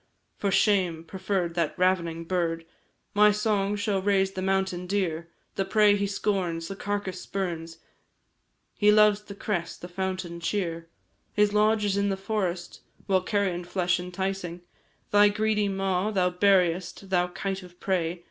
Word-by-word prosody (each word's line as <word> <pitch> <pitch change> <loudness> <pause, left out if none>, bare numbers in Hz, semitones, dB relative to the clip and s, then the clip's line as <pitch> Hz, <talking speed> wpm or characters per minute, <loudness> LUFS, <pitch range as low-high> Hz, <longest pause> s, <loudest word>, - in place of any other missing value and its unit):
For 200 - -1
shame! 185 -5 +2
preferr'd 185 0 -2
that 165 -1 -1
ravening 170 -3 +1
bird! 165 -2 -1 0.5
My 210 +1 +6
song 210 -1 0
shall 205 -2 0
raise 195 -1 +2
the 190 - -5
mountain 190 -1 0
deer; 170 -4 -1 0.3
The 195 - +2
prey 210 +1 +4
he 200 0 0
scorns, 185 -5 -1
the 195 - -5
carcase 200 -2 -3
spurns, 165 -4 -4 1.0
He 210 0 +6
loves 210 -1 +5
the 205 -1 -10
cress, 190 -5 -3
the 175 - -9
fountain 185 -1 -4
cheer. 170 -2 -2 0.4
His 210 0 +3
lodge 210 0 +3
is 200 -1 +1
in 200 0 +1
the 195 - -1
forest; 190 -4 -3 0.2
While 190 -2 +2
carion 185 -3 -1
flesh 175 0 0
enticing 180 -1 -4 0.5
Thy 205 0 +6
greedy 210 0 +1
maw, 195 0 0
thou 185 -4 +1
buriest 180 0 +1
Thou 180 -1 +3
kite 195 +2 -4
of 180 -1 -15
prey! 175 -2 -1
190 Hz, 150 wpm, -27 LUFS, 175-205 Hz, 1.0 s, My